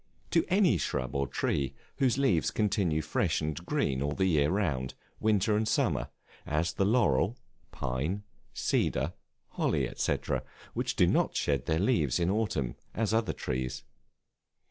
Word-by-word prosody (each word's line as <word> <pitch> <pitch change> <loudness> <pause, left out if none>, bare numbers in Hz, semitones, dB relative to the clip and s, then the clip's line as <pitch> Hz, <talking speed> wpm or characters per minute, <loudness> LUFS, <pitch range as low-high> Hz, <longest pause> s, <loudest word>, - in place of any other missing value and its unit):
To 165 - +4
any 185 - +4
shrub 65 -2 -2
or 70 0 0
tree 70 +1 -1 0.2
whose 130 -3 +2
leaves 135 - +3
continue 95 -7 +1
fresh - - +1
and 75 -1 -2
green 65 -1 0
all 70 +1 0
the 95 - +1
year 75 -5 +3
round, 75 -10 -1 0.2
winter 105 0 +2
and 110 +1 +1
summer, - - +1 0.3
as 80 +2 0
the 95 - +1
laurel, 105 - +2 0.3
pine, 70 +11 -2 0.3
cedar, - - 0 0.4
holly, - - 0
&c., - - +1 0.6
which - - -1
do - - +5
not - - +2
shed 70 -2 0
their 80 - +2
leaves 85 - +2
in 85 +2 +2
autumn 95 - -1 0.2
as 110 -1 0
other 115 0 +1
trees. 65 0 -3
85 Hz, 145 wpm, -30 LUFS, 70-105 Hz, 0.6 s, do